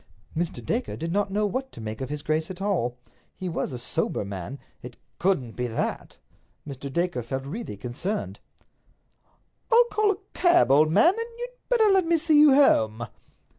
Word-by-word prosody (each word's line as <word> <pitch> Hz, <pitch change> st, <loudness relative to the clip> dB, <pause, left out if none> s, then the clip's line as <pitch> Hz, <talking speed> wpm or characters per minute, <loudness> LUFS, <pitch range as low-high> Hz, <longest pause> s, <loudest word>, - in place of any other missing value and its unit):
Mr. 170 Hz, +2 st, -3 dB
Dacre 240 Hz, +3 st, -2 dB
did 165 Hz, +2 st, -4 dB
not 200 Hz, +2 st, 0 dB
know 210 Hz, +2 st, 0 dB
what 260 Hz, +7 st, -3 dB
to -, -, -11 dB
make 110 Hz, +1 st, -6 dB
of 130 Hz, -, -4 dB
his 150 Hz, 0 st, -5 dB
grace 155 Hz, +1 st, -1 dB
at 185 Hz, -1 st, -7 dB
all. 175 Hz, -, -1 dB, 0.4 s
He 185 Hz, -, -5 dB
was 165 Hz, -, -2 dB
a 125 Hz, -, -5 dB
sober 120 Hz, -3 st, -2 dB
man—it 115 Hz, +5 st, -9 dB, 0.2 s
couldn't 170 Hz, -11 st, +1 dB
be 125 Hz, +2 st, -3 dB
that! 115 Hz, -, -4 dB, 0.5 s
Mr. 140 Hz, -1 st, -7 dB
Dacre 170 Hz, -4 st, -1 dB
felt 135 Hz, +3 st, -5 dB
really 175 Hz, -, -6 dB
concerned. 170 Hz, -, -4 dB, 1.3 s
"I'll 475 Hz, +1 st, +7 dB
call 430 Hz, -1 st, +2 dB
a 400 Hz, -, +1 dB, 0.2 s
cab, 350 Hz, -, +4 dB
old 155 Hz, +3 st, +5 dB
man, 340 Hz, -, +5 dB
and 460 Hz, +2 st, -4 dB
you'd 485 Hz, +1 st, -5 dB, 0.2 s
better 475 Hz, -3 st, +4 dB
let 380 Hz, -3 st, +3 dB
me 335 Hz, 0 st, +4 dB
see 310 Hz, -2 st, +4 dB
you 295 Hz, -3 st, +7 dB
home." 115 Hz, -, +4 dB
175 Hz, 175 wpm, -26 LUFS, -, 1.3 s, I'll